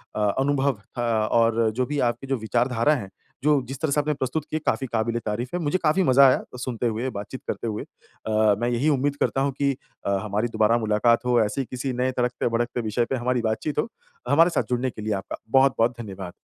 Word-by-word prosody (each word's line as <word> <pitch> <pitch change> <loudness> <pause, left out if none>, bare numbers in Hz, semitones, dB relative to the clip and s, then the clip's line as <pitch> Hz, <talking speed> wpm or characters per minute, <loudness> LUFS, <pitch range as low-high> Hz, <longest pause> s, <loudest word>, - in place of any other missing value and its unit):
अ, - - -2 0.2
अनुभव 135 -3 +1 0.2
था 115 -3 +1
और 115 -1 +3
जो 125 +1 +1
भी 145 +1 -3
आपके 120 +3 -6
जो 135 - +1
विचारधारा 120 +4 +1
है, 100 -7 -6 0.3
जो 150 -2 +4
जिस 135 +1 -6
तरह 155 - 0
से 150 - +2
आपने 150 +1 -1
प्रस्तुत 140 +2 -3
की 155 - 0
काफ़ी 135 -3 -1
क़ाबिल-ए-तारीफ़ 115 +1 -2
है। - - -1
मुझे 150 +3 +1
काफ़ी 160 +5 +3
मज़ा 135 -2 +6
आया, 130 - +3
सुनते 120 -2 -2
हुए 115 +4 -2
बातचीत 105 +6 -7
करते - - -3
हुए। 110 -1 -3
अ, 110 -1 -1
मैं 120 +1 0
यही 120 +6 +1
उम्मीद 145 0 +1
करता 135 - +1
हूँ 140 +1 +1
कि 140 -1 +2 0.3
अ, - - 0
हमारी 105 +3 -1
दोबारा 110 0 +2
मुलाकात 115 +2 +2
हो, 125 -1 +3
ऐसे 110 +6 0
ही - - -4
किसी 130 +1 -3
नए 125 +1 0
तड़कते-भड़कते 120 0 0
विषय 115 +2 0
पे - - 0
हमारी 125 0 0
बातचीत 115 +7 -2
हो। 185 - +1 0.4
हमारे 165 +4 +5
साथ - - 0
जुड़ने 125 +1 0
के 110 - -9
लिए 110 0 -1
आपका 95 -1 -4
बहुत-बहुत 125 -3 +3
धन्यवाद। 95 -4 -7
120 Hz, 215 wpm, -24 LUFS, 115-135 Hz, 0.4 s, मज़ा